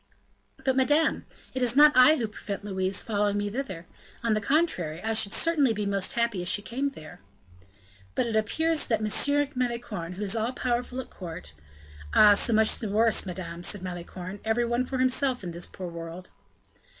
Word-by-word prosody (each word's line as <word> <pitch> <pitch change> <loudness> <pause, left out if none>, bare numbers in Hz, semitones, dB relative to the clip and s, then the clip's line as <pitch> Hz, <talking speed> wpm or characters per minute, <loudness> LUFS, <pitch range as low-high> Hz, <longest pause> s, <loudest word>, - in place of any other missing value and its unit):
"But, 265 -1 +2
madame, 295 +4 +2 0.3
it 260 - -3
is 245 -1 +2
not 300 +1 +8
I 255 +5 +7
who 235 -7 -2
prevent 205 -1 -7
Louise 190 -1 -1
following 205 -2 0
me 205 0 -2
thither; 195 -9 -5 0.4
on 230 -2 +2
the 215 - 0
contrary, 215 - 0
I 225 0 -1
should 210 -2 +3
certainly 295 -6 +2
be 210 -1 -3
most 200 -1 0
happy 235 -5 0
if 175 - -5
she 205 +3 +1
came 270 +6 -2
there." 155 - -12 0.9
"But - - +1
it 230 -2 -3
appears 315 +9 +1
that 225 - +1
M. 285 +7 +1
Malicorne, 235 -8 -3
who 195 +3 -5
is 200 +2 -1
all 225 +3 -1
powerful 250 0 -2
at - - -14
court 165 - -9 0.3
" 75 0 -16
"Ah! 210 -1 +8
so 205 - +2
much 220 0 +3
the 220 - -4
worse, 220 0 +2
madame," 175 -1 -6
said 190 +2 -2
Malicorne, 180 +2 -7
"every 225 +2 +1
one 240 +2 0
for 260 - -4
himself 255 -1 +1
in 175 - -5
this 170 +1 -5
poor 185 - -8
world." 170 +2 -9
215 Hz, 190 wpm, -27 LUFS, 185-255 Hz, 0.9 s, not